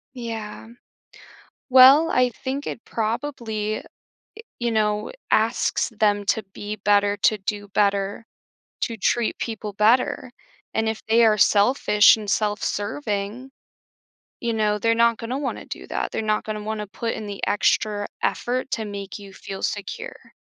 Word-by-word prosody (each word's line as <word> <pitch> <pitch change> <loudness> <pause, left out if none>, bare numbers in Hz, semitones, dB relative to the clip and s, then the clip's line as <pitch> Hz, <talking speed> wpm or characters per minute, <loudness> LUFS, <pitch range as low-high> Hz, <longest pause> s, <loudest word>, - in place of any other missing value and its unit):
Yeah. 225 -3 -6 1.0
Well, 265 +5 +8
I 250 0 +3
think 265 +4 -5
it 230 - -6
probably 220 -2 -3
i - - -14 0.8
you 240 -1 -1
know, 210 -1 0 0.2
asks 225 +4 +1
them 205 -1 +2
to 220 +2 +1
be 210 +1 -6
better, 205 0 +2
to 215 +3 +3
do 205 +1 -4
better, 200 +1 0 0.6
to 230 - -1
treat 225 +2 0
people 215 -2 -4
better, 250 +5 +2 0.4
and 220 0 +1
if 220 0 -3
they 230 +1 +5
are 215 -1 +4
selfish 210 0 +5
and 210 -2 -8
self 210 -1 0
serving, 210 +2 -3 0.9
you 235 -1 -1
know, 210 -1 +1
they're 230 0 +3
not 235 0 +3
gonna 245 +4 -4
wanna 280 -2 -4
do - - -8
that, - - -2
they're - - -2
not 215 0 0
gonna 215 -1 -4
wanna 215 -1 -3
put 230 +3 -3
in 215 - -6
the 200 -1 -7
extra 205 0 +1 0.2
effort 255 +2 -1
to 225 - -1
make 200 -1 -6
you 200 -1 -11
feel 190 0 -8
secure 205 -2 -5
215 Hz, 150 wpm, -23 LUFS, 205-235 Hz, 1.0 s, Well